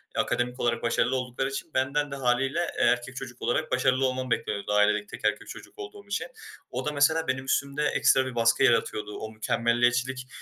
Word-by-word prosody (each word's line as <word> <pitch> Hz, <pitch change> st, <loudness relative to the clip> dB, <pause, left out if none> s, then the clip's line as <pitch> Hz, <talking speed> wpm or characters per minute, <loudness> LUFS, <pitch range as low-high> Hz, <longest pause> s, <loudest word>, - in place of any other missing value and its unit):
akademik 125 Hz, 0 st, -1 dB
olarak 115 Hz, -1 st, 0 dB
başarılı 120 Hz, +2 st, +1 dB
oldukları 125 Hz, +1 st, -2 dB
için 140 Hz, +4 st, -6 dB
benden 140 Hz, +2 st, 0 dB
de -, -, -3 dB
hâliyle, 135 Hz, +3 st, +1 dB, 0.2 s
eee, -, -, +2 dB
erkek 125 Hz, +1 st, +1 dB
çocuk 125 Hz, -1 st, -8 dB
olarak 155 Hz, +6 st, -1 dB
başarılı 130 Hz, +1 st, +2 dB
olmam 130 Hz, -1 st, -2 dB
bekleniyordu 100 Hz, -2 st, -1 dB
ailedeki 105 Hz, 0 st, +3 dB
tek -, -, -8 dB
erkek 105 Hz, 0 st, 0 dB
çocuk -, -, -11 dB
olduğum 405 Hz, 0 st, -9 dB
için. -, -, -2 dB, 0.4 s
O -, -, -4 dB
da 150 Hz, -, 0 dB
mesela 160 Hz, +3 st, +2 dB
benim 130 Hz, 0 st, -1 dB
üstümde 140 Hz, +2 st, 0 dB
ekstra 130 Hz, 0 st, +3 dB
bir 130 Hz, -2 st, -6 dB
baskı 115 Hz, +2 st, +3 dB
yaratıyordu. 105 Hz, -4 st, +1 dB
O 110 Hz, -, -6 dB
mükemmeliyetçilik 120 Hz, +3 st, 0 dB
130 Hz, 185 wpm, -27 LUFS, 120-135 Hz, 0.4 s, ailedeki